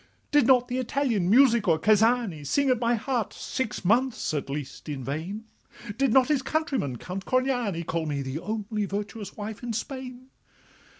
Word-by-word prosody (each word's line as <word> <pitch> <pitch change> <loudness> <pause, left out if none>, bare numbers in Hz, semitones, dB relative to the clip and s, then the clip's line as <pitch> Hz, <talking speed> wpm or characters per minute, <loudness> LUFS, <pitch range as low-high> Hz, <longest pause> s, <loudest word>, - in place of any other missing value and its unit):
'Did 290 -5 +4
not 250 -2 +5
the 250 +1 -2
Italian 240 -7 0
Musico 230 -8 +5
Cazzani 215 -3 +2
Sing 275 - +2
at 250 - +2
my 240 0 +2
heart 235 0 -2
six 230 -7 -4
months 240 0 +1
at 145 -2 -3
least 145 +1 -6
in 140 -3 -4
vain? 170 - -4 0.5
Did 270 -3 +2
not 260 +1 +5
his 295 -3 +2
countryman, 270 - -1
Count 185 +9 -6
Corniani, 245 -8 0
Call 165 -1 -2
me 140 -2 -2
the 130 +3 -4
only 215 +1 -3
virtuous 205 +1 -5
wife 210 0 -6
in 240 -2 -4
Spain? 255 +2 -6
225 Hz, 165 wpm, -26 LUFS, 180-255 Hz, 0.5 s, not